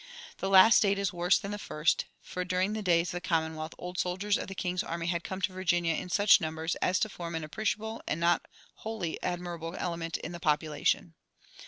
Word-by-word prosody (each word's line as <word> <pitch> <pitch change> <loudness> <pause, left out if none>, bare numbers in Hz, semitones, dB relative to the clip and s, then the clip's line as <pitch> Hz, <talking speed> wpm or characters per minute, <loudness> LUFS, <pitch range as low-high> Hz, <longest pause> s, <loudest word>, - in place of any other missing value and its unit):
The 195 - -1
last 195 +3 +8
state 200 -1 +3
is 200 0 -1
worse 175 +2 +3
than 200 -1 -5
the 205 - -4
first; 155 -4 0 0.2
for 180 - -4
during 185 +3 0
the 215 - -3
days 175 -3 +2
of - - -3
the 175 - -4
Commonwealth 160 -3 -1
old 180 +1 -6
soldiers 190 +3 0
of - - -3
the 195 - -7
king's 180 0 -1
army 170 0 -4
had 170 0 -1
come 190 0 -5
to 185 - 0
Virginia 175 -2 +1
in 180 - -4
such 200 +2 +5
numbers 160 +1 -2
as 185 - +1
to - - +2
form 170 -5 -6
an 160 - -3
appreciable 215 +7 -3
and 155 - -1
not 170 +1 +2 0.3
wholly 220 -7 -4
admirable 175 -1 -4
element 165 -1 -3
in - - -7
the 175 - -7
population. 155 +1 0
180 Hz, 210 wpm, -30 LUFS, 165-195 Hz, 0.3 s, last